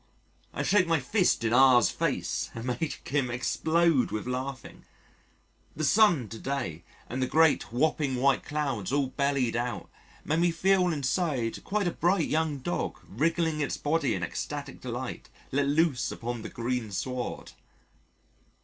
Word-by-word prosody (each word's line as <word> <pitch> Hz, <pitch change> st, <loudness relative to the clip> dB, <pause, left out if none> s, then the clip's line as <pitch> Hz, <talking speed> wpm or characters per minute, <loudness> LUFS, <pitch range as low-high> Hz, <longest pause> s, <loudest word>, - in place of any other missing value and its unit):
I -, -, -3 dB
shake 195 Hz, -3 st, +3 dB
my 165 Hz, -2 st, +2 dB
fist 180 Hz, -, +1 dB
in 115 Hz, 0 st, +1 dB
R 130 Hz, -1 st, +7 dB
's 120 Hz, -, +2 dB
face -, -, -2 dB
and 115 Hz, +1 st, -6 dB
make 125 Hz, +5 st, -3 dB
him 140 Hz, -3 st, 0 dB
explode 160 Hz, +4 st, +2 dB
with 110 Hz, -, -4 dB
laughing.... 130 Hz, 0 st, -5 dB, 0.9 s
The 155 Hz, -, -3 dB
sun 175 Hz, -, +4 dB
to 110 Hz, -, -8 dB
day, 110 Hz, -, -3 dB, 0.2 s
and 130 Hz, +2 st, -4 dB
the 130 Hz, -, +1 dB
great, 160 Hz, -6 st, +3 dB
whopping 140 Hz, +1 st, +1 dB
white 135 Hz, +2 st, +2 dB
clouds 135 Hz, -9 st, -2 dB
all 140 Hz, -2 st, +1 dB
bellied 140 Hz, -3 st, 0 dB
out, 120 Hz, +1 st, -3 dB, 0.3 s
made 155 Hz, +2 st, +1 dB
me 175 Hz, +1 st, +3 dB
feel 185 Hz, +2 st, +2 dB
inside 145 Hz, -5 st, -1 dB
quite 205 Hz, -1 st, -1 dB
a -, -, +1 dB
bright 175 Hz, -1 st, +1 dB
young 155 Hz, -2 st, 0 dB
dog 90 Hz, -10 st, -3 dB
wriggling 160 Hz, -, 0 dB
its 145 Hz, -, -1 dB
body 150 Hz, -4 st, 0 dB
in 90 Hz, -, -3 dB
ecstatic 85 Hz, -, -5 dB
delight -, -, -5 dB, 0.2 s
let 140 Hz, +1 st, +1 dB
loose 150 Hz, -2 st, +1 dB
upon 120 Hz, 0 st, -5 dB
the -, -, -6 dB
green 120 Hz, -1 st, -3 dB
sward. 125 Hz, +5 st, -4 dB
140 Hz, 155 wpm, -28 LUFS, 125-160 Hz, 0.9 s, R